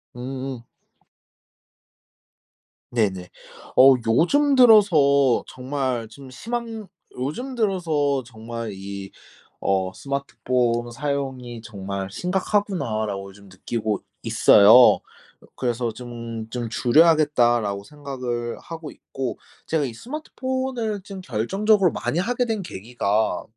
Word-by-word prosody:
으으응. 130 Hz, 0 st, -6 dB, 2.3 s
네네. 95 Hz, -6 st, -1 dB, 0.5 s
어 135 Hz, +1 st, +8 dB
요즘 275 Hz, -, +3 dB
들어서 155 Hz, -, +5 dB
정말 130 Hz, -3 st, -3 dB
좀 135 Hz, +3 st, -13 dB
심한 225 Hz, -, -5 dB, 0.3 s
요즘 195 Hz, -, -4 dB
들어서 160 Hz, -, 0 dB
정말 115 Hz, -1 st, -7 dB
이 95 Hz, 0 st, -7 dB, 0.5 s
어 95 Hz, -1 st, 0 dB
'스마트폰 125 Hz, -3 st, -1 dB
사용이 130 Hz, -2 st, -4 dB
정말 100 Hz, -2 st, -5 dB
심각하구나.' 180 Hz, -, -1 dB
라고 100 Hz, -1 st, -5 dB
좀 100 Hz, -1 st, -17 dB
느끼고 105 Hz, +2 st, -3 dB, 0.2 s
있어요. 110 Hz, +5 st, +7 dB, 0.6 s
그래서 120 Hz, -2 st, -1 dB
'좀 115 Hz, -1 st, -7 dB
좀 120 Hz, -1 st, -4 dB
줄여야겠다.' 145 Hz, -2 st, +4 dB
라고 100 Hz, -2 st, -3 dB
생각을 125 Hz, -3 st, -5 dB
하고 165 Hz, -2 st, -8 dB
있고 130 Hz, -4 st, -6 dB, 0.3 s
제가 160 Hz, -2 st, 0 dB
이 125 Hz, -4 st, -3 dB
스마트폰을 260 Hz, -, -4 dB
좀 195 Hz, 0 st, -9 dB
결정적으로 190 Hz, -, +2 dB
많이 165 Hz, -, -2 dB
하게 245 Hz, +5 st, 0 dB
된 220 Hz, -3 st, -2 dB
계기가 110 Hz, -, -1 dB
130 Hz, 225 characters per minute, -23 LUFS, 115-175 Hz, 2.3 s, 어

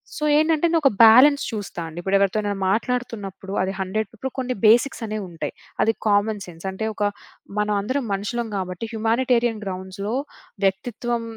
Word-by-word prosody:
So -, -, -5 dB
ఏంటంటే 315 Hz, +1 st, +3 dB
నేను 330 Hz, 0 st, +3 dB
ఒక 275 Hz, -, +6 dB
బ్యాలన్స్ 260 Hz, +6 st, +7 dB
చూస్తా 205 Hz, -5 st, -5 dB
అండి. 165 Hz, +1 st, -8 dB
ఇప్పుడెవరితోనైనా 200 Hz, +2 st, +1 dB
మాట్లాడుతున్నప్పుడు 205 Hz, -4 st, -3 dB
అది 190 Hz, +1 st, 0 dB
హండ్రెడ్ 195 Hz, +2 st, -2 dB
ఇప్పుడు 265 Hz, +4 st, -5 dB
కొన్ని 255 Hz, -1 st, -2 dB
బేసిక్స్ 235 Hz, +3 st, +4 dB
అనేవి 215 Hz, -1 st, -4 dB
ఉంటాయి. 165 Hz, -2 st, -5 dB, 0.3 s
అది 225 Hz, -, +3 dB
కామన్ 205 Hz, 0 st, +2 dB
సెన్స్. 170 Hz, 0 st, -12 dB
అంటే 190 Hz, +3 st, -4 dB
ఒక 210 Hz, -, -3 dB, 0.6 s
మనం 210 Hz, 0 st, +1 dB
అందరం 260 Hz, +5 st, -2 dB
మనుషులం 225 Hz, +4 st, -2 dB
గాబట్టి 185 Hz, +2 st, -4 dB
హ్యుమానిటేరియన్ 230 Hz, 0 st, +1 dB
గ్రౌండ్స్‌లో 190 Hz, +3 st, -4 dB, 0.5 s
వ్యక్తిత్వం 230 Hz, +4 st, -1 dB
215 Hz, 150 wpm, -23 LUFS, 195-240 Hz, 0.6 s, బ్యాలన్స్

